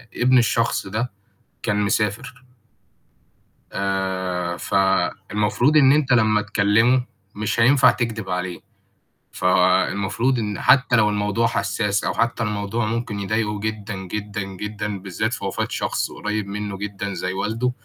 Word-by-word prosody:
ابن 130 +1 +4
الشخص 115 -3 +1
ده 110 +5 -2 0.5
كان 105 -1 0
مسافر 110 +4 -1 1.3
آآ 95 -3 -2
فالمفروض 105 - +1
إن 135 -3 +7
أنت 145 -3 +2
لمّا 110 -3 +3
تكلّمه 110 +4 +3 0.3
مش 105 +2 -1
هينفع 130 +2 +6
تكدب 115 -5 -3
عليه، 90 0 -3 0.7
فالمفروض 115 +6 +2
إن 105 -2 -3
حتّى 125 -2 +4
لو 110 -2 +4
الموضوع 105 +2 +1
حساس 100 -1 -1
أو - - -1
حتّى 115 0 0
الموضوع 105 +1 -2
ممكن 110 -2 -3
يضايقه 105 +1 -1
جدًا، 110 0 -4
جدًا، 100 +2 -5
جدًا، 105 +1 -5
بالذات 100 +4 -3
في - - -4
وفاة 95 - -2
شخص - - -2
قريِّب 105 -1 -3
منه 100 0 -4
جدًا 100 0 -5
زي 90 0 -3
والده، 110 +6 -1
105 Hz, 130 wpm, -22 LUFS, 100-115 Hz, 1.3 s, إن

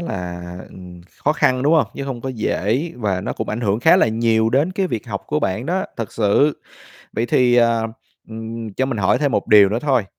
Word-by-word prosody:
là, 90 - -5 0.2
ừm, 90 -1 -12 0.2
khó 150 - +4
khăn, 130 -4 +1
đúng 150 +4 +3
hông? 155 - +3
Chứ 140 - -5
hông 130 -3 -5
có 135 - -5
dễ 120 - -1
và 100 -5 -1
nó - - -4
cũng - - -5
ảnh 110 +3 -3
hưởng 105 0 0
khá 165 +7 +6
là 185 - +3
nhiều 110 0 +1
đến 145 +9 +1
cái 190 0 0
việc 115 - -4
học - - -4
của - - -1
bạn 110 +8 -2
đó, 190 +3 -1
thật 115 -4 -5
sự. 115 +7 +2 0.5
Vậy 115 +2 -1
thì, 125 0 +3
à, 115 -1 +3 0.5
ừm, 115 0 -7
cho 130 - 0
mình 125 -5 -3
hỏi 95 - +2
thêm 145 -3 0
một - - 0
điều 105 -2 +7
nữa 110 +3 -1
thôi, 130 -7 +1
115 Hz, 230 wpm, -20 LUFS, 105-135 Hz, 0.5 s, điều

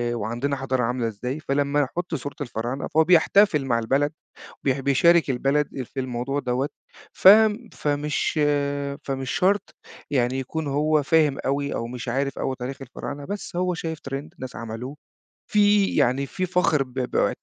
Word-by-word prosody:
وعندنا 120 +6 -2
حضارة 130 -2 -1
عاملة 120 0 0
إزاي. 125 +6 -4
فلمّا 145 -1 0
يحُط 170 +5 -3
صورة 140 +1 -6
الفراعنة 120 +1 -3
فهو 160 +1 +3
بيحتفل 175 -2 +4
مع 115 -3 +1
البلد، 135 +6 +1 0.5
بي 135 0 +1
بيشارِك 160 +4 +4
البلد 135 +2 0
في 135 +2 -6
الموضوع 130 +2 -2
دوّة. 130 +2 -1 0.4
ف 185 - +5 0.4
فمش 150 +1 -1 0.6
فمش 135 -1 -3
شرط 200 +3 +1 0.4
يعني 130 -1 +1
يكون 150 +4 -4
هو 150 +2 +2
فاهِم 150 -1 +3
أوي 140 +1 -1
أو 115 - -2
مش 125 +1 -7
عارِف 135 +3 -1
أوي 130 -1 -2
تاريخ 130 +2 -5
الفراعنة، 140 +2 -7
بس 200 0 -6
هو 180 0 0
شايِف 165 -1 -4
trend 135 - -2 0.2
ناس 130 -1 -7
عملوه، 115 +5 -6 0.5
فيه 205 -1 +3
يعني، 130 +3 +2
فيه 185 - -3
فخر 180 -5 +2
ب 130 -2 -10
ب 130 -2 0
140 Hz, 155 wpm, -24 LUFS, 130-155 Hz, 0.6 s, ف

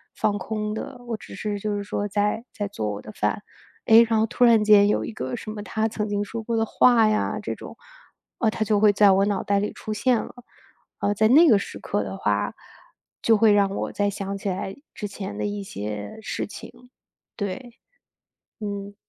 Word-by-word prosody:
放 205 -1 0
空 210 +1 -3
的， 250 +3 -6
我 230 -2 -3
只 - - -12
是 205 -1 -3
就 210 +1 -2
是 205 - -3
说 205 0 -3
在 210 +3 -1
在 205 -1 -3
做 110 - -3
我 100 - -6
的 110 - -10
饭， 105 - -2 0.4
哎， 230 +1 +7
然 225 - +2
后 220 - +3
突 245 +2 +2
然 230 -3 +5
间 210 -1 +6
有 210 - +1
一 - - -5
个 220 - -4
什 215 -2 -7
么 215 -1 -6
他 220 +2 -1
曾 215 -1 -3
经 205 0 0
说 225 +2 -5
过 230 +1 -2
的 225 - +2
话 230 -1 +4
呀， 215 - 0
这 - - -3
种， - - -10 0.6
啊， 225 - +3
他 215 - -1
就 210 -1 +2
会 210 0 +5
在 200 0 +6
我 195 +1 +4
脑 200 -1 -1
袋 200 0 +1
里 205 - -2
出 215 - -7
现 240 +4 +2
了， - - -10 0.7
呃， 205 - +1
在 215 +2 +3
那 305 +8 +7
个 215 -5 +6
时 - - -7
刻 105 - -2
的 95 -1 -5
话 105 0 0 0.7
就 225 - +4
会 220 0 +5
让 200 -1 +3
我 195 - -3
再 205 0 0
想 195 0 -4
起 200 - -6
来 190 +1 -3 0.2
之 210 - -4
前 195 0 -6
的 - - -2
一 205 0 -3
些 105 - -6
事 - - -4
情， 245 +4 -12 0.5
对， 230 +4 -5 0.9
嗯。 200 -1 -5
205 Hz, 230 characters per minute, -24 LUFS, 200-220 Hz, 0.9 s, 哎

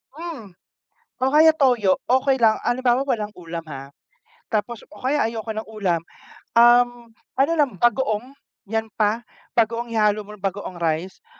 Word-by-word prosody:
Hmm, 315 - -8 0.7
o 260 - +2
kaya 320 +1 +7
toyo 245 -10 +2 0.2
okey 265 0 +1
lang, 220 -2 +5
halimbawa 250 +1 +1
walang 220 -6 -1
ulam 170 -1 -7
ha. 140 -1 -8 0.6
Tapos, 220 +2 -2
o 205 - -14
kaya 275 +5 0
ayoko 225 -1 -3
ng 220 0 -6
ulam, 185 -6 -1 0.5
um, 240 +1 +6 0.5
ano 285 - +2
lang 285 -5 +3
bagoong, 240 -2 +1 0.4
'yan 225 0 -1
pa. 220 +2 0 0.3
Bagoong 230 +1 +1
ihalo 215 -2 +2
mo 210 +1 -11
na - - -25
bagoong 195 -2 -4
rice 170 - -3
225 Hz, 145 wpm, -22 LUFS, 205-245 Hz, 0.7 s, kaya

